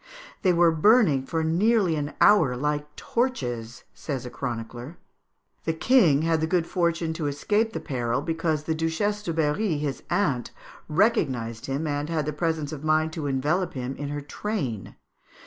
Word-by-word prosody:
"They 185 - +4
were 170 -1 +4
burning 160 - +4
for 160 -1 -1
nearly 185 +2 +2
an 145 -1 -4
hour 155 -12 +5
like 150 +2 -2
torches," 120 - -2
says 135 -4 -5
a 125 - -7
chronicler. 120 +4 -6 0.7
"The 160 - +1
king 160 - +4
had 165 -1 +1
the 160 - +1
good 175 -1 +1
fortune 170 -2 0
to 160 -2 -3
escape 210 +10 0
the - - -3
peril, 120 -5 -2
because 165 -2 -1
the 160 - -1
Duchesse 165 +6 -1
de 180 - -3
Berry, 160 +3 0
his 145 -2 -3
aunt, 155 - 0 0.4
recognised 130 - +1
him, 140 +4 -2
and 145 0 -2
had 160 -3 -1
the 150 - -2
presence 160 -1 -1
of 150 -2 -7
mind 155 0 +2
to 155 -3 -3
envelop 150 +7 0
him 130 +1 -4
in 145 -1 -5
her 145 0 -4
train" 145 - -3
(Fig. - - -14
155 Hz, 170 wpm, -25 LUFS, 140-170 Hz, 0.7 s, hour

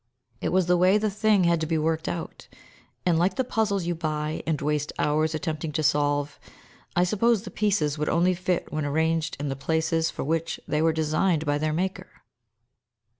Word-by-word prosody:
It - - 0
was 185 -1 +2
the 180 +1 +3
way 185 +3 +5
the 215 0 0
thing 210 -1 +3
had 170 -1 +2
to 160 - -1
be 160 0 0
worked 160 +1 -1
out; 170 -1 -6 0.6
and 170 -2 +3
like 180 +2 +2
the 260 - +1
puzzles 210 -6 0
you 175 - 0
buy, 155 -1 -3
and 160 -3 0
waste 150 0 -1
hours 155 +1 +1
attempting 155 0 -3
to 155 0 -1
solve, 145 0 +1 0.6
I 175 - +4
suppose 215 +3 +2
the - - -8
pieces 160 -9 0
would 150 - 0
only 175 +2 +3
fit 180 0 -2
when 155 0 -1
arranged 160 +2 0
in 145 0 -2
the 135 - -2
places 160 +3 0
for - - -5
which 165 +3 -1
they 150 - 0
were 165 0 +4
designed 160 +1 +1
by 145 0 0
their 155 +1 0
Maker. 185 +3 -3
160 Hz, 195 wpm, -26 LUFS, 155-180 Hz, 0.6 s, way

